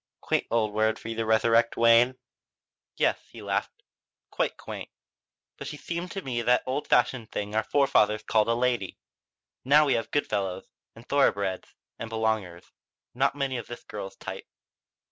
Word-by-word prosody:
Quaint - - -1
old 110 -3 +1
word 110 +1 +1
for 115 - -8
you 115 - -3
to 115 -1 -1
resurrect, 115 +1 +3
Wayne." 115 +2 +5 0.8
"Yes," - - +1
he - - -11
laughed, - - -3 0.5
"quite - - -1
quaint. - - -8 0.7
But - - -7
she - - -6
seems 170 +1 -5
to 195 - -5
me 125 -3 -3
just 120 - -2
that 125 0 +4
old 135 +3 -2
fashioned 125 -2 +2
thing 105 0 -4
our 110 - +2
forefathers 110 -7 +2
called 110 0 +2
a 115 - +2
lady. 120 -5 -1 0.7
Now 150 +3 +5
we 140 - +2
have 115 - -1
good 145 - +1
fellows, 95 -3 -2 0.3
and 115 +1 -15
thoroughbreds, 100 -9 +1 0.2
and 115 - -5
belongers. 110 -6 -2 0.4
Not 135 +3 +1
many 135 -2 -1
of 115 - -6
this 120 - -9
girl's 95 -2 -7
type." - - -8
115 Hz, 170 wpm, -27 LUFS, 110-130 Hz, 0.8 s, Wayne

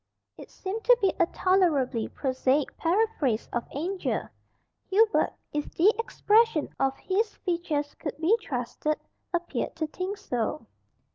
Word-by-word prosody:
It - - -12
seemed 405 +4 -5
to - - +7
be 390 -4 +2
a 345 - +4
tolerably 300 - +2
prosaic 265 +1 0
paraphrase 335 - +1
of 240 - -2
"Angel." 360 +7 -2 0.6
Hubert, 430 +3 +4 0.2
if 295 0 -2
the 395 +6 +5
expression 455 -6 +3
of 270 0 +1
his 420 +3 -1
features 335 -5 -2
could 295 - -4
be 330 +8 +4
trusted, 290 - -2 0.3
appeared 345 -1 -2
to 320 - -1
think 370 +6 -4
so. 255 - -2
340 Hz, 130 wpm, -27 LUFS, 285-400 Hz, 0.6 s, to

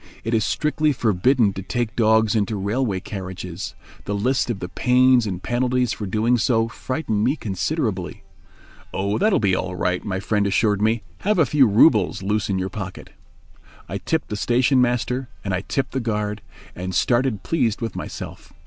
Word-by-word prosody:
It 115 - -2
is 110 -2 +3
strictly 150 - +1
forbidden 115 0 +2
to 95 - -5
take 115 +3 -3
dogs 110 -1 +3
into 105 0 0
railway 100 +1 -1
carriages. 95 -1 -6 0.3
The 100 - -2
list 125 +6 +1
of 120 - -1
the 90 - -5
pains 125 +2 +3
and 95 -2 -4
penalties 125 0 +1
for 105 - -5
doing 115 +5 +2
so 115 0 +2
frightened 120 -3 -2
me 130 +6 +2
considerably. 105 - -3 0.7
"Oh, 100 +2 -1
that 215 +2 +3
will - - +3
be 100 -3 +2
all 90 0 -3
right," 90 +1 -1
my 95 -3 -2
friend 105 0 0
assured 105 +1 +2
me; 110 0 +1 0.2
"have 210 +1 +1
a 160 - +5
few 135 -1 +4
roubles 105 - +4
loose 105 +1 0
in 95 - 0
your 95 0 -2
pocket." 95 -3 -7 0.8
I - - -4
tipped - - -2
the 105 - -3
station 125 +4 +3
master 125 +1 0 0.2
and 100 - -1
I 90 - 0
tipped 135 +6 -2
the 135 - -1
guard, 105 -3 -2 0.3
and 90 +1 -4
started 120 -3 +1
pleased 125 -10 0
with 115 -1 -4
myself. - - -7
110 Hz, 180 wpm, -22 LUFS, 100-125 Hz, 0.8 s, a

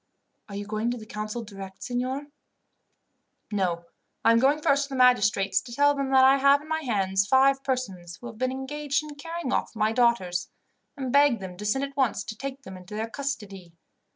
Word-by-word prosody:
"Are 200 - -7
you 205 +1 -4
going 215 +2 -2
to 245 - -2
the 220 - -10
council 215 +2 -5
direct, 195 -2 -10
signor?" 255 +3 -2 1.3
"No. 180 -4 -1 0.4
I - - +7
am 230 - +5
going 280 +4 +3
first 280 -1 +2
to - - -15
the 270 - -5
magistrates, 210 -6 +3
to 245 - -12
tell 285 +4 +4
them 275 -1 -2
that 265 -1 +6
I 270 +1 +6
have 280 +1 +5
in - - -14
my 315 0 -1
hands 195 -6 0
five 270 +2 +4
persons, 190 -11 -3
who - - -12
have 230 -2 -9
been 255 0 0
engaged 280 +2 -2
in 300 -1 -8
carrying 330 -1 -5
off - - -1
my 215 0 +1
daughters, 225 -7 +1 0.5
and 260 -3 -3
beg 285 -4 +5
them 185 -2 -7
to 210 +3 -8
send 270 +6 +1
at 275 0 -5
once 255 -6 +1
to 220 - -7
take 275 +3 -6
them 190 0 -9
into 185 +3 -10
their 220 +1 -3
custody. 200 -11 -5
245 Hz, 210 wpm, -26 LUFS, 205-275 Hz, 1.3 s, I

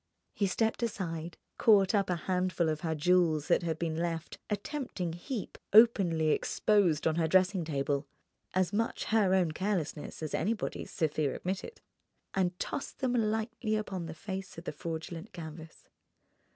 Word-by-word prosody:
He 200 - +1
stepped 225 +5 0
aside, 170 -7 -3 0.2
caught 200 -3 +5
up 200 -3 +2
a 180 - +2
handful 180 0 0
of 155 -1 -2
her 160 -1 -1
jewels 160 -1 +3
that - - +4
had 165 -2 -2
been 160 -1 -2
left, 165 0 -3
a 210 - +1
tempting 205 - -4
heap, 200 +6 -5
openly 190 -8 +6
exposed 180 -2 +2
on 160 0 +2
her 165 -1 +2
dressing 185 +1 +3
table 140 -2 -1 0.5
(as 185 +1 +2
much 225 +2 0
her 200 -4 +4
own 180 -4 +2
carelessness 165 -4 -3
as 155 - -4
anybody's, 210 +6 -1
Sofia 155 -3 0
admitted) 195 - -4 0.5
and 180 -2 0
tossed 275 - -4
them 255 -2 0
lightly 220 -1 0
upon 190 -5 -3
the 160 - -7
face 190 +2 -6
of 165 - -7
the - - -3
fraudulent 165 +5 -6
canvas. 160 -2 -9
180 Hz, 155 wpm, -31 LUFS, 160-205 Hz, 0.5 s, openly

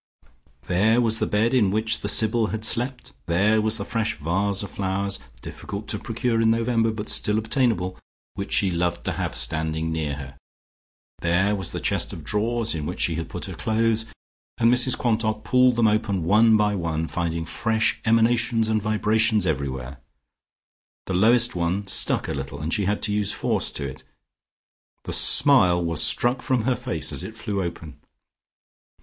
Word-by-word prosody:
There 105 +6 +2
was 115 -2 +1
the - - 0
bed 110 +4 +1
in 115 -7 +3
which 110 +2 0
the - - -3
Sybil 110 0 +3
had 110 0 -4
slept; 125 +2 -3
there 105 +6 +2
was 110 +1 +2
the 100 - -4
fresh 115 -1 -2
vase 95 +6 -1
of 100 - -8
flowers, 100 0 -2 0.2
difficult 100 +2 -7
to 105 - 0
procure 115 0 -1
in 110 - +3
November, 115 0 +1
but 110 -1 -6
still 105 0 0
obtainable, 110 -5 0 0.3
which 100 0 -6
she 95 -2 +1
loved 85 0 -1
to - - -1
have - - -4
standing 80 +1 -1
near 80 -3 -2
her. 70 -1 -10 0.8
There 95 +5 +1
was 95 -4 -3
the - - -4
chest - - -1
of 80 - -9
drawers 115 +6 -1
in 75 -3 -4
which 90 - -6
she 85 - +1
had 80 0 -5
put - - -5
her - - -7
clothes, 110 0 0 0.5
and 115 +1 +4
Mrs 125 0 +4
Quantock 110 -2 -1
pulled 125 -1 +3
them 115 -1 +3
open 105 -4 0
one 110 +5 +4
by 105 -1 +1
one, 80 -4 -2
finding 85 -1 -3
fresh 110 +6 0
emanations 115 0 +2
and 110 -1 +1
vibrations 110 0 +1
everywhere. 70 -3 -3 1.1
The 95 - -4
lowest 120 +6 +4
one 90 +4 -1
stuck 100 - +2
a - - -3
little, 70 0 -6
and 80 +3 -3
she 100 - 0
had 105 +2 -1
to 105 - +2
use 105 0 0
force - - -1
to 70 - -5
it.... 65 - -10 1.0
The - - -5
smile 130 -11 +5
was 80 -2 0
struck 120 +2 +1
from 125 -4 0
her 130 +1 +1
face, 120 - -3
as - - -3
it 110 - -8
flew 105 -3 -3
open. 80 -4 -7
105 Hz, 180 wpm, -23 LUFS, 90-115 Hz, 1.1 s, smile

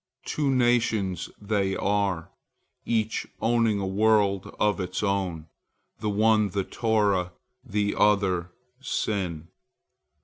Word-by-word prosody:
Two 145 -2 -1
nations 120 -7 +1
they 100 -2 0
are, 100 -4 -1 0.6
each 110 -1 0
owning 115 -2 +2
a 100 - -2
world 100 -1 +2
of 105 -1 +2
its 90 +2 -3
own, 95 -5 -1 0.5
the 105 - -2
one 105 0 +3
the 100 +1 -1
Torah, 100 -5 0 0.3
the 105 -4 -1
other 95 -4 +2 0.3
sin. 95 - -2
100 Hz, 105 wpm, -26 LUFS, 95-110 Hz, 0.6 s, one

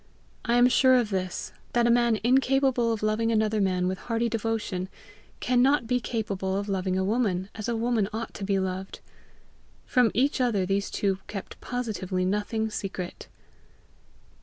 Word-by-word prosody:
I 235 - +1
am 245 +1 +6
sure 260 +1 +5
of 240 -4 +1
this, 185 -2 -3 0.2
that 240 0 +3
a 235 - +4
man 235 -2 +3
incapable 260 -1 +3
of 220 -2 -3
loving 220 +2 +1
another 215 -1 +1
man 185 -2 +1
with 185 0 -2
hearty 230 0 -1
devotion, 220 -5 -2 0.5
can 245 0 +2
not 270 -1 +3
be 250 +2 +1
capable 200 -5 -2
of 200 +1 -3
loving 185 -1 -1
a 190 - +1
woman 200 -3 0
as 215 +1 -5
a 235 - 0
woman 225 -3 0
ought 225 +1 -5
to 205 - -7
be 195 0 +1
loved. 190 0 -3 0.9
From 250 -3 +3
each 265 +3 +2
other 215 -7 +1
these 200 +1 0
two 195 -2 -1
kept 195 -2 -7
positively 205 -7 -2
nothing 210 +3 -1
secret. 190 -3 -5
220 Hz, 165 wpm, -27 LUFS, 195-240 Hz, 0.9 s, am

